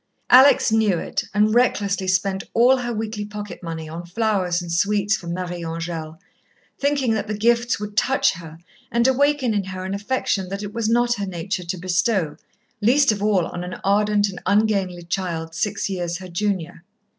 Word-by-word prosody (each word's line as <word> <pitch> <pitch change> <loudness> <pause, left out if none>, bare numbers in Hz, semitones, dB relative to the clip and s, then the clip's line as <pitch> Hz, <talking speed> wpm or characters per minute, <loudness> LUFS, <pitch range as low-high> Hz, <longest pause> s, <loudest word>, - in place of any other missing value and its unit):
Alex 260 -1 +7
knew 215 -5 +3
it, - - -3
and 210 +2 +2
recklessly 205 -5 +1
spent 190 +1 0
all 250 +3 +5
her 240 -1 -3
weekly 215 -1 -3
pocket 205 -2 -7
money 165 -2 -6
on 165 +2 -7
flowers 185 -2 0
and 175 -1 -6
sweets 205 +4 +2
for 175 - -9
Marie 175 0 -4
Angèle, 165 -1 -5 0.6
thinking 280 -4 +1
that 220 -1 -2
the 210 0 -3
gifts 235 +1 +2
would 210 0 -6
touch 265 +5 +2
her 165 -2 -10 0.3
and 235 +1 +3
awaken 270 -2 +2
in 200 -2 -1
her 185 -1 -6
an 190 - -3
affection 200 -3 -1
that 200 +2 -4
it 205 0 -6
was 230 -1 -1
not 240 +1 +3
her 200 -1 -3
nature 180 0 -4
to 175 +2 -3
bestow, 180 -1 0 0.5
least 265 +4 +4
of 205 -2 -3
all 205 -4 +2
on 175 - -6
an 180 +1 -6
ardent 205 +1 +2
and 190 -2 -7
ungainly 200 -4 +1
child, 170 -2 -3
six 180 +5 -1
years 175 -3 -3
her 185 0 -10
junior. 175 -2 -2
200 Hz, 180 wpm, -22 LUFS, 175-220 Hz, 0.6 s, Alex